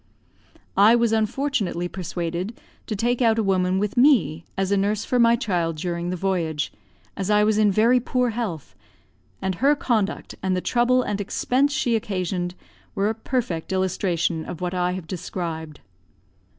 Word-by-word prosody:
I 210 +4 +6
was 235 -1 +2
unfortunately 220 -5 0
persuaded 175 +3 -4 0.3
to 215 - -2
take 240 +4 0
out 225 -2 +4
a 225 - +2
woman 185 -1 +1
with 205 +1 -1
me 180 - +4
as 195 0 0
a - - +4
nurse 205 +2 0
for 250 - +1
my 235 0 +6
child 180 -9 -1
during 170 +1 -3
the 180 - -2
voyage, 170 -5 -1 0.4
as 195 0 -3
I 210 0 +4
was 215 0 +2
in 210 -1 +4
very 230 +5 +4
poor 250 0 0
health; 210 - -4 0.7
and 190 - 0
her 285 +2 +5
conduct, 235 - -1
and 185 -1 0
the - - +1
trouble 245 +5 +2
and 205 -3 -2
expense 255 +7 +1
she 265 -4 +1
occasioned, 185 -4 -2 0.4
were 200 +2 +1
a - - 0
perfect 225 - -3
illustration 180 -3 0
of 165 - -7
what 180 0 -3
I 180 0 0
have 185 -2 -5
described. 165 -3 -5
195 Hz, 165 wpm, -23 LUFS, 180-230 Hz, 0.7 s, I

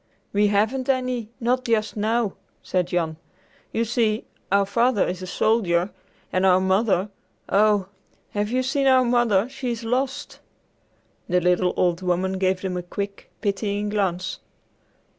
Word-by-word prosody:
"We 205 +1 +4
haven't 220 +6 +1
any, 255 -4 0
not 250 +2 +1
just 220 -2 0
now," 220 0 0 0.3
said 180 -2 0
Jan. 165 -3 -1 0.5
"You 230 - 0
see 225 -2 0 0.3
our 200 0 +4
father 230 +2 +2
is 180 0 -4
a 185 - -6
soldier, 185 -3 +1 0.4
and 185 - +2
our 185 -1 +5
mother, 190 +1 +2 0.4
oh, 205 -1 +3 0.5
have 205 0 -1
you 255 +2 +1
seen 270 +1 +1
our 260 -1 +5
mother? 235 -4 +3
She's 250 -3 -4
lost!" 265 +5 -2 0.9
The 180 0 +3
little 180 +1 +2
old 175 0 +1
woman 185 +1 0
gave 185 -1 +1
them 185 -2 -2
a - - -2
quick, 200 +3 -6
pitying 205 0 -1
glance. 190 -3 -1
205 Hz, 140 wpm, -24 LUFS, 185-235 Hz, 0.9 s, our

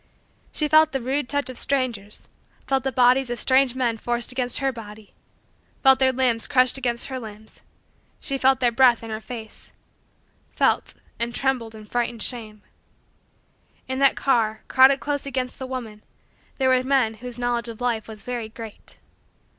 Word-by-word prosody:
She 305 - 0
felt 310 0 +5
the 270 - 0
rude 265 +2 -2
touch 285 0 -1
of 255 -2 -6
strangers 240 -7 -3 0.4
felt 270 -1 0
the 270 - -1
bodies 250 +1 +3
of 240 -1 -3
strange 260 0 +3
men 240 -3 0
forced 240 +2 -2
against 250 -1 0
her 270 -1 0
body 215 -3 -11 0.7
felt 265 -1 +7
their 260 -1 +4
limbs 245 -3 +1
crushed 255 -3 +3
against 240 -2 -2
her 260 -1 -4
limbs 215 -2 -8 0.6
felt 265 -1 +1
their 245 -1 +3
breath 240 -1 +4
in 225 - -7
her 215 - -3
face 225 -1 -10 0.8
felt - - +1 0.2
and 235 +1 -2
trembled 250 -5 -1
in 215 -1 -11
frightened 235 0 -2
shame. 220 -4 -4 1.2
In 260 0 -3
that 275 -1 +4
car, 220 -5 +1
crowded 265 +1 +6
close 285 -1 -3
against 260 -2 -3
the 260 - -5
woman, 230 -5 -7 0.5
there 265 -1 +2
were 255 -1 +4
men 260 -4 +1
whose 250 -1 -6
knowledge 240 -1 -1
of 225 - -9
life 235 -3 -1
was 215 -2 -10
very 240 -3 -4
great. 225 -2 -11
245 Hz, 165 wpm, -23 LUFS, 230-265 Hz, 1.2 s, felt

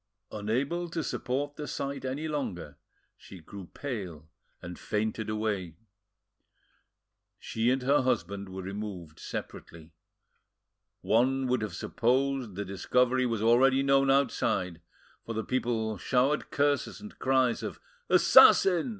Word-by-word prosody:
Unable 135 +12 -2
to 165 -1 -3
support 145 +3 -3
the 150 - -5
sight 140 0 -4
any 135 +4 -3
longer, 95 - -5 0.4
she 95 - -13
grew 95 +3 -10
pale 95 - -6 0.3
and 90 0 -9
fainted 110 +1 -2
away. 105 -6 -2 1.6
She 115 +2 -1
and 130 0 +1
her 140 +2 +3
husband 100 -6 -2
were 95 0 -7
removed 95 -5 -7
separately. 80 0 -8 1.1
One 130 +4 +2
would 125 -2 0
have 110 - -4
supposed 130 -2 0
the 100 +1 -4
discovery 125 +7 +1
was 115 -3 -2
already 130 +4 +4
known 135 0 +3
outside, 100 -10 +1 0.4
for 115 - -6
the 110 0 -2
people 115 -5 -1
showered 135 - +1
curses 145 0 0
and 210 +1 -12
cries 130 -2 +2
of - - -6 0.3
"Assassin!" 180 +1 +6
120 Hz, 125 wpm, -29 LUFS, 100-135 Hz, 1.6 s, Assassin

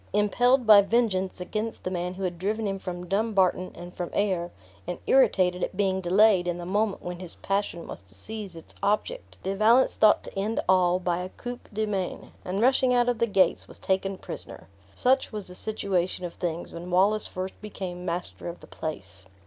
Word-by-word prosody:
Impelled 245 +5 +3
by 210 -2 +9
vengeance 200 -4 0
against 215 +5 -4
the 185 - -3
man 180 0 -3
who 195 - -6
had 175 -2 -3
driven 215 +4 -1
him 195 -1 -2
from 180 -1 -6
Dumbarton 195 -2 +1
and 175 +1 -9
from 175 -1 -4
Ayr, 185 -4 0 0.4
and 180 - -3
irritated 185 -9 +3
at 185 - -3
being 190 -2 +1
delayed 190 0 +4
in 175 -1 -1
the 175 - -6
moment 205 +2 0
when 175 0 -5
his 180 -2 -9
passion 195 -4 -2
was - - -7
to 95 0 -16
seize 210 - -7
its 165 - -11
object, 215 - -1
De 195 +1 -1
Valence 230 +5 +4
thought 215 -1 +5
to - - -11
end 205 +3 -1
all 180 -1 +4
by 180 -1 -1
a 180 +1 -4
coup 245 +5 -7
de 215 +1 -1
main 195 -4 -3
and 190 +3 -2
rushing 260 0 +4
out 245 0 +3
of 240 -2 -1
the 235 - +2
gates, 195 -3 +2
was - - -12
taken 190 0 -1
prisoner. - - -8 0.3
Such 260 +1 +2
was 210 -3 -5
the - - -9
situation 185 -3 -1
of 175 - -6
things, 170 -1 -4
when 170 +1 -7
Wallace 200 +4 +4
first 185 +1 -6
became 185 -4 -6
master 175 0 -4
of 170 0 -6
the - - -13
place. 95 - -7
190 Hz, 200 wpm, -27 LUFS, 180-215 Hz, 0.4 s, by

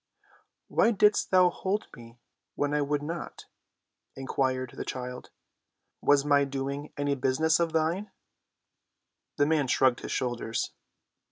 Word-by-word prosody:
"Why - - +3
didst 210 -1 +3
thou 180 -1 +5
hold 200 +3 -2
me 115 -2 -14 0.4
when 145 0 -1
I 150 - +2
would 145 0 -1
not?" 165 +3 -6 0.7
inquired 130 -1 -1
the - - -4
child. 125 -1 -6 0.7
"Was 145 0 +4
my 145 -1 +4
doing 140 +1 -4
any 145 0 0
business 140 +5 +2
of 170 -1 +1
thine?" 165 +6 0 1.3
The 145 - +4
man 150 -2 +1
shrugged 125 0 +3
his - - -7
shoulders. 120 -2 -2
145 Hz, 125 wpm, -28 LUFS, 130-160 Hz, 1.3 s, thou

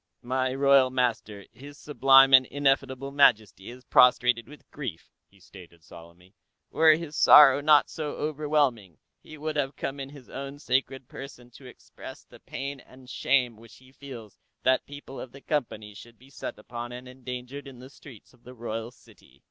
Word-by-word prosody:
"My 130 +1 -1
royal 140 -1 +4
master, 115 -5 -2
His 145 +2 -14
Sublime 135 -2 +4
and 130 -1 +7
Ineffable 135 -1 -1
Majesty, 110 -8 +2
is 125 +1 -13
prostrated 125 -1 +3
with 150 - -16
grief," 125 - -8 0.2
he 100 - -26
stated 90 -4 -16
solemnly. 85 +4 -16 0.4
"Were 160 -1 +5
his 160 -2 -8
sorrow 140 -1 +7
not 150 0 +4
so 150 -2 -6
overwhelming, 145 - -2 0.2
he 155 - -13
would 155 +1 -5
have 140 -1 -2
come 140 +1 -5
in 135 0 -7
His 140 -3 -15
Own 140 +1 -8
Sacred 130 -1 -2
Person 125 -3 -12
to 130 +2 -15
express 125 - -13
the - - -18
pain 140 +1 -7
and 130 +1 -18
shame 125 -4 0
which 115 -3 -17
he 130 0 -20
feels 125 -7 -12 0.2
that 130 0 +1
people 145 -1 -11
of 130 - -9
the 140 - -14
Company 110 -9 -4
should 115 +3 -15
be 130 +4 -21
set - - -7
upon 120 +2 -8
and 125 +1 -10
endangered 125 +2 -9
in 135 -2 -12
the 130 +2 -13
streets 130 -6 -16
of 120 - -26
the 125 +1 -13
royal 115 -1 -6
city." 125 - -22
130 Hz, 175 wpm, -26 LUFS, 120-140 Hz, 0.4 s, and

